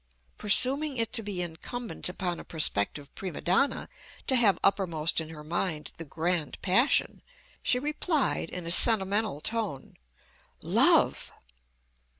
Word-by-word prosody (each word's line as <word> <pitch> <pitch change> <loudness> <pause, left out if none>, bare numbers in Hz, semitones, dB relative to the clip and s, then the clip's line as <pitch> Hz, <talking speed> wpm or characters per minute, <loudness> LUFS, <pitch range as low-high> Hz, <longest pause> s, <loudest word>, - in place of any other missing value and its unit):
Presuming 270 +7 +4
it 230 -1 -1
to 240 - +2
be 200 -4 -4
incumbent 195 +8 -5
upon 180 -1 -4
a - - -9
prospective 145 -2 0
prima 185 -5 -7
donna 195 +11 0 0.4
to 260 - +2
have 225 -6 +4
uppermost 170 -5 +1
in 160 - -8
her 155 -2 -10
mind 160 -1 -3
the 165 - -8
grand 160 +1 -3
passion, 230 +9 +2 0.4
she 250 - +2
replied, 300 - -1
in 180 -2 -7
a 170 - -2
sentimental 200 - +2
tone, 215 - -5 0.7
"Love!" - - +3
185 Hz, 130 wpm, -27 LUFS, 165-230 Hz, 0.7 s, Presuming